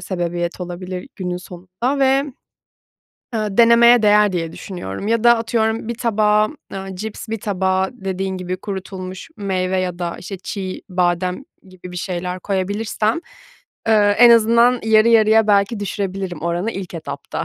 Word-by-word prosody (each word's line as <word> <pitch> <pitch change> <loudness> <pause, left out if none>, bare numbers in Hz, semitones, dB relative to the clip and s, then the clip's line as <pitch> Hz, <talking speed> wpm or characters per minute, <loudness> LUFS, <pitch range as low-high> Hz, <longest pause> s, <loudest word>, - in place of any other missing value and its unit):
sebebiyet 175 -1 -3
olabilir 180 +1 -6
günün 180 -2 -3
sonunda. 185 +9 -4
Ve, 270 +1 +3 1.1
ııı, 210 -3 -2
denemeye 235 0 +6
değer 210 -1 +4
diye 165 -2 -3
düşünüyorum. 180 - -6
Ya 230 0 +1
da 235 -1 +6
atıyorum 225 0 -1
bir 235 - -2
tabağa, 215 -2 +2 0.2
ııı, 195 -1 -6
cips, 220 +2 -7
bir 225 -2 -4
tabağa 190 -2 0
dediğin 190 -3 -4
gibi 185 0 -4
kurutulmuş 190 -1 -7
meyve 190 -2 -1
ya 180 -1 -3
da, 170 -1 -3
işte, 195 +2 -7
çiğ 190 0 -6
badem 180 +5 0 0.2
gibi 185 -1 -12
bir - - -7
şeyler 180 0 -4
koyabilirsem, 210 - -1 0.7
ııı, 210 -2 +5
en 235 +3 +7
azından 235 +2 +5
yarı 220 +1 +5
yarıya 220 -1 +5
belki 205 +1 +2
düşürebilirim 190 -4 -4
oranı 175 +6 -1
ilk 185 -2 -7
etapta. 165 - -5
195 Hz, 145 wpm, -19 LUFS, 180-220 Hz, 1.1 s, en